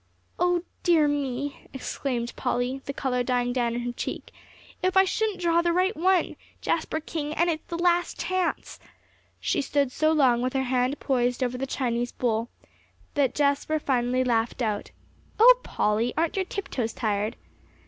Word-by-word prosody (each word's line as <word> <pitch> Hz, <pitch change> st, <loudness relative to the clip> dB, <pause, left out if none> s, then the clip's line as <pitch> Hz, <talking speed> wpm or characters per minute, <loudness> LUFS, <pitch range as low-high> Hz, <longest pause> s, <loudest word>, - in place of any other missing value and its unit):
"Oh 355 Hz, -1 st, +2 dB, 0.2 s
dear 330 Hz, -4 st, +4 dB
me!" 280 Hz, -1 st, -3 dB
exclaimed 250 Hz, -2 st, -3 dB
Polly, 250 Hz, +1 st, -1 dB
the -, -, -3 dB
color 260 Hz, -2 st, -1 dB
dying 245 Hz, 0 st, 0 dB
down 240 Hz, -2 st, 0 dB
in 240 Hz, -, -2 dB
her 245 Hz, 0 st, -3 dB
cheek, 240 Hz, -, -5 dB, 0.5 s
"if 370 Hz, +1 st, +1 dB
I 380 Hz, -, +8 dB
shouldn't 420 Hz, 0 st, -1 dB
draw 340 Hz, -1 st, +3 dB
the 340 Hz, 0 st, +1 dB
right 370 Hz, +4 st, +2 dB
one, 365 Hz, +2 st, +2 dB, 0.2 s
Jasper 315 Hz, -1 st, -1 dB
King; 305 Hz, -1 st, -4 dB
and 340 Hz, +1 st, +3 dB
it's 315 Hz, -1 st, -5 dB
the 335 Hz, -, -4 dB
last 350 Hz, 0 st, +1 dB
chance." 370 Hz, -2 st, -2 dB, 0.6 s
She -, -, 0 dB
stood 280 Hz, -1 st, 0 dB
so 310 Hz, +4 st, +2 dB
long 260 Hz, -6 st, +4 dB
with 255 Hz, +1 st, -1 dB
her 265 Hz, -1 st, +1 dB
hand 255 Hz, +2 st, 0 dB
poised 250 Hz, -1 st, 0 dB
over 250 Hz, 0 st, -1 dB
the 270 Hz, +2 st, -3 dB
Chinese 245 Hz, -2 st, -1 dB
bowl, 230 Hz, -1 st, -1 dB, 0.6 s
that 275 Hz, -4 st, +1 dB
Jasper 290 Hz, +2 st, +1 dB
finally 255 Hz, -3 st, +1 dB
laughed 235 Hz, 0 st, 0 dB
out. 210 Hz, -2 st, -2 dB, 0.5 s
"Oh, -, -, +8 dB
Polly, 220 Hz, -, 0 dB
aren't 330 Hz, 0 st, +1 dB
your 385 Hz, -1 st, 0 dB
tiptoes 260 Hz, -, -3 dB
tired?" 210 Hz, -2 st, -1 dB
270 Hz, 165 wpm, -26 LUFS, 245-335 Hz, 0.6 s, I